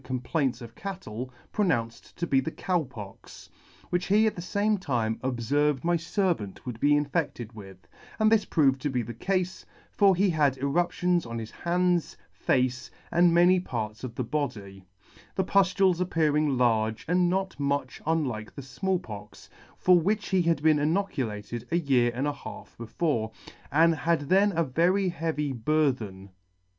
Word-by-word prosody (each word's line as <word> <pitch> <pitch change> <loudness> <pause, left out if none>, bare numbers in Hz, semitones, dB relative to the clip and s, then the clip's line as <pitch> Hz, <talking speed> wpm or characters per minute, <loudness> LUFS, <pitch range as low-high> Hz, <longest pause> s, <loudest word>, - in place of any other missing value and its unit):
of 125 - -18
[ - - -21 0.2
94 160 - +3
] 120 +1 -15
of 115 - -23
cattle) 130 - -6 0.2
pronounced 120 - -1
to 170 - -1
be 135 -5 +3
the 135 - -2
Cow 180 +1 -1
Pox, 110 -8 -11 0.4
which 175 0 0
he 210 +3 +4
at 220 - +1
the 175 - -6
fame 205 +3 0
time 115 -10 -1
obferved 130 +3 0
my 175 +1 +2
fervant 165 - -2
would 120 -3 -6
be 145 +3 +4
infedted 145 -6 -2
with: 95 -3 -11 0.4
and 215 0 +3
this 225 -2 +4
proved 135 -4 +2
to 145 - -1
be 125 -3 -1
the 120 +2 -7
cafe; 185 - -2 0.3
for 200 -2 +4
he 190 +1 +2
had 145 -4 +2
eruptions 175 +5 +1
on 115 0 -5
his 110 -1 -6
hands, 175 0 0
face, 125 -1 0 0.2
and 175 0 +5
many 175 +2 +5
parts 110 -10 -5
of 120 -3 -6
the 130 - -2
body, 105 -9 -4 0.5
the 190 - +1
pud: 190 0 +3
ales 185 -2 +4
appearing 150 -5 +1
large, 110 -3 +1
and 180 +1 +3
not 190 -2 -2
much 140 -2 -2
unlike 130 -10 -1
the 140 - -7
Small 140 +9 -1
Pox, 105 -7 -10 0.3
for 180 -1 +5
which 205 +5 -1
he 190 -2 +3
had 165 -4 +1
been 155 -1 +5
inocu 155 - 0
lated 105 +3 -7
a 170 - +3
year 130 -7 +2
and 130 +3 -1
a 145 - 0
half 140 - -10
before, 115 -1 -1 0.4
and 165 +3 +5
had 160 0 0
then 195 +8 +3
a 170 - +3
very 175 +7 +2
heavy 155 -4 -2
bur 150 +5 +2
then. 100 -5 -9
150 Hz, 175 wpm, -27 LUFS, 120-175 Hz, 0.5 s, and